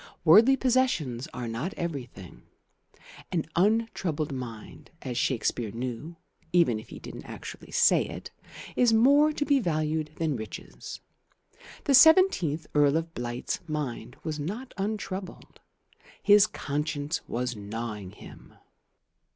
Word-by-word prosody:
But - - -40
worldly 220 +11 +7
possessions 235 - +1
are 125 -2 -5
not 115 +12 -4
everything. 130 - -6 0.9
An 170 -4 0
untroubled 185 -6 +1
mind, 120 -5 -8
as 125 -3 -4
Shakespeare 120 -2 0
knew 125 +8 -5 0.4
(even 165 -11 +3
if 110 - -13
he - - -9
didn't - - -9
actually - - -9
say - - +4
it), - - -8 0.4
is 240 -2 +4
more 285 +7 +5
to 295 -1 -2
be 285 -1 +3
valued 155 - -1
than 160 -3 -1
riches. 105 - -8 0.8
The 280 - +2
seventeenth 265 - +6
Earl 145 0 +4
of 165 0 -4
Blight's 120 0 -3
mind 130 -6 -4
was 155 -2 -3
not 210 - -5
untroubled. 195 -2 -5 0.6
His 205 0 +7
conscience 150 0 -3
was 125 0 -2
gnawing 105 -1 -6
him. - - -14
155 Hz, 125 wpm, -27 LUFS, 125-205 Hz, 0.9 s, worldly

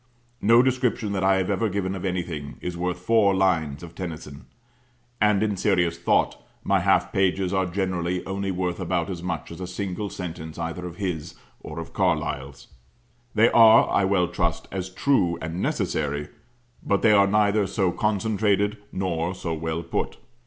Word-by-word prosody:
No 115 +3 +6
description 125 -4 0
that 95 -1 -1
I 95 0 +4
have 95 +1 0
ever 100 +3 0
given 95 -1 -2
of 95 - -6
anything 85 -6 -3
is 90 -1 -5
worth 90 +1 -2
four 100 +1 +3
lines 85 -6 +1
of 85 - -10
Tennyson; 80 -5 -7 0.7
and 105 -1 +4
in 105 -2 0
serious 90 -4 +1
thought, 85 - +1 0.2
my - - +2
half - - +2
pages 95 -1 +1
are 95 -1 +1
generally 90 -1 -2
only 100 +1 -3
worth 90 -1 -2
about 90 0 -1
as 85 -2 -5
much 85 -4 -4
as 85 - -9
a 90 - -4
single 95 +2 -4
sentence 80 -4 -7
either 85 +2 -4
of 85 - -9
his, 85 -4 -4 0.2
or - - -9
of - - -7
Carlyle's. 70 +1 -1 0.7
They 115 +2 +5
are, 115 -1 +7
I - - +3
well 95 -2 +2
trust, 85 -1 -2
as 95 -1 -4
true 90 -4 +1
and 80 +3 -4
necessary; 75 -1 -1 0.5
but 100 - 0
they 110 - +6
are 100 -1 +5
neither 105 0 +2
so 95 -2 0
concentrated 105 0 +1
nor 90 -1 -2
so 90 -3 -4
well 80 +1 -3
put. 85 - -3
95 Hz, 170 wpm, -25 LUFS, 85-100 Hz, 0.7 s, are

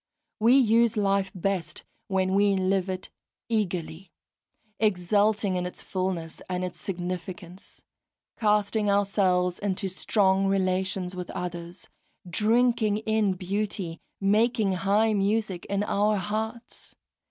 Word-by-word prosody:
We 235 +5 +5
use 230 -2 +4
life 195 -1 +1
best 185 -2 -2 0.2
when 190 -2 0
we 200 0 +3
live 190 0 +1
it 185 0 -5 0.4
eagerly, 185 -5 -2 0.7
exulting 205 0 +2
in 180 0 -1
its 180 - -7
fulness 185 -4 -3
and 180 0 -1
its 180 - -7
significance, 180 0 -6 0.5
casting 210 -1 +1
ourselves 195 -3 +2
into 200 -1 -1
strong 190 +1 +1
relations 185 -1 0
with 180 -1 -6
others, 175 0 -6 0.4
drinking 220 +2 +2
in 220 -3 +2
beauty, 185 -2 -3 0.2
making 215 +1 +2
high 200 +4 +2
music 200 -2 0
in 200 +1 -1
our 210 +1 +1
hearts. 220 +4 -5
195 Hz, 110 wpm, -26 LUFS, 185-210 Hz, 0.7 s, We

